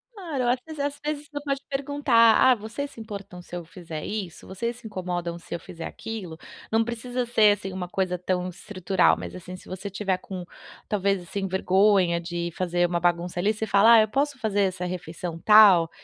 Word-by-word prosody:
Claro, 310 - -3
às 250 - +3
vezes 315 -2 -9
às 285 0 -2
vezes 300 -1 -3
você 290 - -4
pode 275 -1 -2
perguntar: 270 -5 +4
"Ah, 260 -1 +6
vocês 230 +6 -5
se - - -13
importam 200 -4 -8
se 175 - -10
eu 175 - -5
fizer 165 -3 -8
isso? 195 -6 -5
Vocês 235 +5 -4
se 240 -2 -10
incomodam 175 -3 -4
se 170 - -10
eu 170 - -3
fizer 165 -1 -9
aquilo?". 190 -8 -7 0.3
Não 225 +1 +3
precisa 245 +1 -3
ser 220 -3 +5
assim 195 -1 -6
uma 185 -1 -5
coisa 180 0 -1
tão 180 0 -1
estrutural, 190 +1 +1
mas - - -7
assim, 180 0 -8
se 185 - -14
você 190 +2 -5
tiver 195 -1 -1
com 185 0 -7 0.4
talvez 195 -2 0
assim 195 +3 -4
vergonha 190 -1 +3
de 170 0 -4
fazer 175 -1 +1
uma 170 0 -1
bagunça 175 0 0
ali, 205 +4 +2
você 220 +1 -4
fala: 205 +3 +6
"Ah, 225 - +8
eu 215 - +2
posso 275 +4 -1
fazer 210 -4 0
essa 185 -2 -1
refeição 175 -1 -5
tal?". 200 -5 +7
195 Hz, 200 wpm, -25 LUFS, 180-230 Hz, 0.4 s, Ah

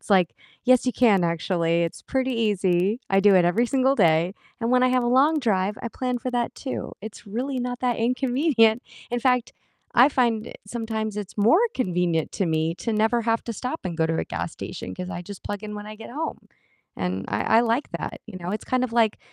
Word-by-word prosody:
It's - - -16
like, 185 -4 +4 0.3
"Yes, 255 0 +4
you 250 - +2
can 215 -8 +4
actually. 170 0 0
It's 165 - -5
pretty 260 -1 -1
easy, 205 -1 +1
I 195 0 +4
do 200 0 +6
it 180 -2 +5
every 215 +8 +2
single 265 +1 +2
day," 165 +1 +3 0.3
and 230 0 0
when 250 0 +4
I - - +4
have 255 0 +2
a - - 0
long 280 +6 +4
drive, 205 -6 0
I 235 - -2
plan 250 +1 -2
for 255 - -4
that 240 -1 -1
too 265 - -5
it's 220 +1 -9
really 255 +6 -3
not 245 0 -4
that 250 -2 +1
inconvenient. 250 -1 +2 0.3
In 245 0 -1
fact, 250 -1 +1 0.5
I 250 +4 +8
find 235 -4 0
sometimes 220 -2 -3
it's 205 -2 -6
more 230 - +5
convenient 175 - 0
to 195 - -1
me 160 0 0
to 230 - -3
never 225 +2 +2
have 225 0 +1
to 235 - -4
stop 255 +8 -4
and 175 -3 -4
go 165 - +2
to 160 0 -1
a - - -1
gas - - -4
station 95 - -7
'cause 180 0 -6
I 175 - -5
just 200 +2 -10
plug 205 0 -4
in 210 0 -6
when 210 0 -7
I 215 0 -8
get 225 - -10
home 305 +5 -3 0.6
and 95 +1 -2
I 105 - +2
I - - +6
like 235 +4 0
that, - - -6
you - - -9
know? 175 0 -5
It's 215 - -4
kind 255 0 0
of 245 - -4
like 230 -3 +2
225 Hz, 225 wpm, -24 LUFS, 185-250 Hz, 0.6 s, I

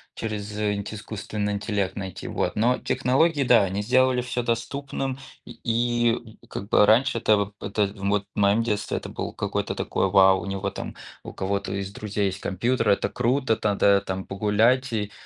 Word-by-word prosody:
через, 105 -1 -5
э, 105 -1 0
инт 100 +1 -5
искусственный 105 -1 -4
интеллект 100 -1 -2
найти, 95 -3 -6
вот. - - -1
Но 120 +4 +2
технологии, 140 +4 +2
да, 120 -4 +5
они 95 +1 -2
сделали 130 +2 +3
всё 125 0 -3
доступным. 130 +3 -3 0.3
И - - -10
и 120 0 +2 0.3
и - - -20
как 100 - -7
бы 105 - +5
раньше 115 +4 +4
эта 110 -2 +3
вот 100 0 -2
эта 105 -2 0
вот 100 0 -1
в - - -4
моем 100 +3 +3
детстве 105 -2 -2
это - - -4
был - - -5
какой-то - - -2
такой 95 - 0
"вау", 95 -1 +6
у - - -7
него 100 0 -2
там, - - -7 0.3
у - - -8
кого-то 100 0 -2
из 100 -1 -4
друзей 105 0 -2
есть 95 +1 -4
компьютер, 115 +5 0
это 100 - +1
круто, 125 0 +1
эт 110 - -14
надо, 100 -1 +2
э, - - -1
там, 95 0 -4
погулять 115 +6 +2
и 105 -2 -2
105 Hz, 195 wpm, -25 LUFS, 100-120 Hz, 0.3 s, вау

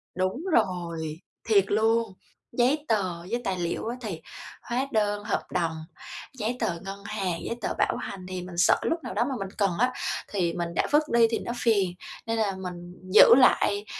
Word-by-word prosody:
đúng 185 - -1
rồi, 165 - 0 0.3
thiệt 205 -3 +5
luôn, 225 0 +2 0.4
giấy 260 +5 +1
tờ 185 -6 0
với 240 +2 -1
tài 190 -1 -1
liệu 170 +5 -2
á 235 - -2
thì 190 -9 -5 0.4
hóa 250 +3 -2
đơn 205 -2 0
hợp - - -1
đồng, 165 -2 0 0.6
giấy 240 -1 -3
tờ - - +1
ngân 195 +1 -8
hàng, 190 -5 -2
giấy 230 - -3
tờ - - -1
bảo - - +1
hành 185 -2 -6
thì 185 -1 -4
mình 175 -1 -9
sợ 175 - +5
lúc 330 - 0
nào 250 - -5
đó - - +2
mà 265 +1 -2
mình 195 - -3
cần 200 -1 +3
á 250 +2 +3 0.4
thì 175 -4 -1
mình 170 -1 -2
đã - - +1
vứt 295 +1 +5
đi 235 -1 +6
thì 230 - -1
nó - - -5
phiền. 205 -6 +3 0.4
Nên 230 0 -1
là 215 -3 +1
mình 180 -1 -7 0.2
giữ 215 - +9
lại, 210 -5 +4
205 Hz, 195 wpm, -27 LUFS, 180-230 Hz, 0.6 s, giữ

